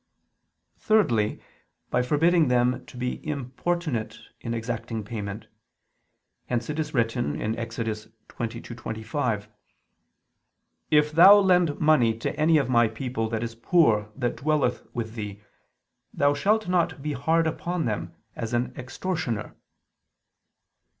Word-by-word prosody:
Thirdly, 120 - +2 0.5
by 125 - +2
forbidding 160 +5 +3
them 125 +1 +2
to - - -12
be 125 0 -3
importunate 140 -4 -3 0.2
in 115 - -5
exacting 115 -1 -3
payment. 105 -1 -6 1.0
Hence 120 +3 -2
it 150 - -4
is 150 -2 -3
written 115 - 0 0.2
(Ex. 115 0 -6
22:25): 110 +1 -4 1.4
"If 150 0 +4
thou 185 +6 +9
lend 180 -6 +3
money 125 -8 +4
to 115 - -3
any 155 +1 +4
of 140 -4 +1
my 120 -2 +4
people 110 0 -3
that 115 0 -2
is 115 -1 -4
poor 115 -5 +2
that 125 -3 -2
dwelleth 150 -4 0
with 115 -2 -4
thee, 105 -2 -6 0.7
thou 145 0 +2
shalt 210 +8 +1
not 175 -6 0
be 150 -1 -2
hard 160 +5 +1
upon 170 +2 -2
them 105 -3 -3 0.2
as 115 +1 -3
an 125 +1 -1
extortioner." 130 - -4
125 Hz, 120 wpm, -26 LUFS, 115-155 Hz, 1.4 s, thou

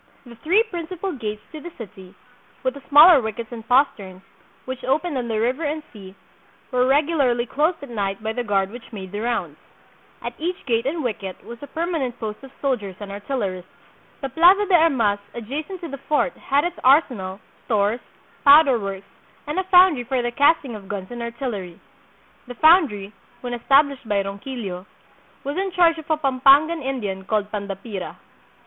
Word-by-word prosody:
The 240 -1 -12
three 360 - +3
principal 365 -2 -5
gates 215 -7 -5
to 310 - -9
the 345 - -7
city, 190 -4 -11 0.5
with 260 -1 0
the 280 - -11
smaller 300 +1 +8
wickets 220 +1 -5
and 230 -2 -7
posterns, 205 -8 +1 0.4
which 260 -1 -6
opened 310 +4 0
on 245 -2 -2
the 220 -2 -1
river 255 +8 0
and 305 +1 -2
sea, 195 -3 -12 0.6
were 250 0 +2
regularly 275 -4 +2
closed 310 +6 0
at 280 - -9
night 200 -2 -3
by 220 0 -2
the 245 - -2
guard 195 -3 0
which 240 +1 -11
made 190 -4 -8
the 205 - -4
rounds. 235 0 -2 0.6
At - - -4
each 350 +3 -4
gate 235 -1 0
and 315 +2 -2
wicket 200 -6 -5
was 235 0 -10
a 285 - -8
permanent 315 -8 -3
post 215 -2 -5
of 270 - -10
soldiers 220 -9 -2
and 205 -1 -7
artillerists. 200 -4 -4 0.5
The 270 - -3
Plaza 360 +8 +5
de 390 - -2
Armas 265 -12 +3 0.2
adjacent 295 - -6
to 340 - -5
the 275 -2 -7
fort 300 - 0
had 280 +1 0
its 350 0 -3
ar 275 +5 +7
senal, 190 -6 -7 0.3
stores, 215 0 +1 0.4
powder 280 -3 +7
works, 195 -1 -5 0.4
and 300 +4 -2
a - - 0
foundry 360 -8 +5
for 255 +2 -1
the 240 - -1
cast 285 +5 +3
ing 245 - -6
of 205 -3 -9
guns 195 0 -6
and 240 -1 -6
artillery. 235 -7 -5 0.7
The 245 - -8
foundry, 265 - +4 0.3
when 245 -1 -5
established 275 +1 +2
by 200 -1 +1
Ronquillo, 195 -2 -6 0.6
was 285 +4 -4
in 385 0 -1
charge 335 -3 +3
of 315 - -12
a 315 - +2
Pampangan 280 +3 +4
Indian 215 -8 -3
called 210 +1 -1
Pandapira. 200 -1 -6
250 Hz, 180 wpm, -22 LUFS, 210-300 Hz, 0.7 s, smaller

